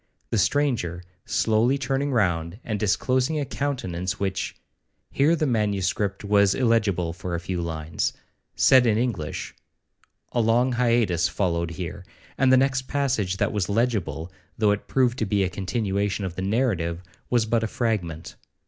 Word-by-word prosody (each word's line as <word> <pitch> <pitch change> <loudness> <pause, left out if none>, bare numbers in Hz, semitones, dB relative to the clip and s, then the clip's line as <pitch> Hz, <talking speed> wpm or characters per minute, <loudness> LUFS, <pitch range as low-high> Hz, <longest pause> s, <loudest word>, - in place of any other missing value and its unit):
The 115 - +2
stranger, 100 - 0 0.2
slowly 115 +5 +2
turning 135 +1 -1
round, 90 -5 0
and 110 -3 -3
disclosing 130 +8 +1
a 145 - -1
countenance 95 -11 -3
which—(Here 100 - -2
the 155 - 0
manuscript 100 -4 0
was 100 -1 +3
illegible 105 -9 +1
for 90 -1 -4
a - - -2
few 90 0 -3
lines), 80 -1 -2 0.4
said 130 -2 +5
in 110 -2 +3
English—(A 115 +2 -5
long 120 +3 +3
hiatus 115 -8 +2
followed 85 -2 -1
here, 85 +2 -6 0.3
and 130 0 +3
the 130 - +7
next 130 0 +1
passage 125 -10 0
that 105 +2 0
was 105 -3 -1
legible, 100 -7 -1 0.3
though 105 -2 +3
it 105 - -2
proved 125 -1 +1
to 110 - +1
be 100 0 +2
a 95 - -1
continuation 100 +1 -1
of 90 - -4
the 95 - -5
narrative, 95 -5 0 0.3
was 120 -3 +2
but 115 +1 +1
a 110 - -1
fragment). 100 -9 -2
105 Hz, 150 wpm, -25 LUFS, 90-125 Hz, 0.4 s, the